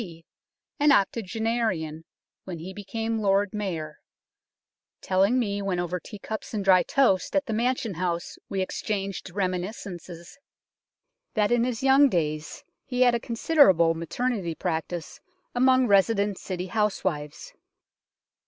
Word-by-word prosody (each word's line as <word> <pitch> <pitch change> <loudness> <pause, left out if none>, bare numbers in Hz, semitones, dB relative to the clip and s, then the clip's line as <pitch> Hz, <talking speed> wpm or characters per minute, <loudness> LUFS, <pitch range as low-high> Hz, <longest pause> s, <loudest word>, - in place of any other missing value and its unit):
D., 165 -5 -10 0.5
an 295 0 +5
octogenarian 215 - 0 0.4
when 180 -3 -6
he 175 +4 -8
became 225 +3 -3
Lord 200 0 +2
Mayor, 165 -8 -4 1.0
telling 195 +6 +2
me 205 -5 -1
when 190 -3 -1
over 175 +1 -2
tea 210 - -10
cups 220 +2 -6
and 200 -2 -2
dry 185 -2 +6
toast 220 -8 +2
at 290 0 +2
the 225 - -3
Mansion 235 -1 0
House 170 0 -3
we 195 - -1
exchanged 195 0 -3
reminiscences, 180 - -5 1.0
that 210 -1 +2
in 240 0 +3
his 250 -1 -3
young 270 +1 +6
days 155 -5 -2 0.2
he 250 -1 -3
had 245 -1 +6
a 235 - +1
considerable 230 - +4
maternity 170 +2 -2
practice 165 -1 -4 0.3
among 255 +1 +4
resident 200 -1 +2
City 180 -1 -4
housewives. 185 -7 -2
195 Hz, 125 wpm, -26 LUFS, 175-230 Hz, 1.0 s, dry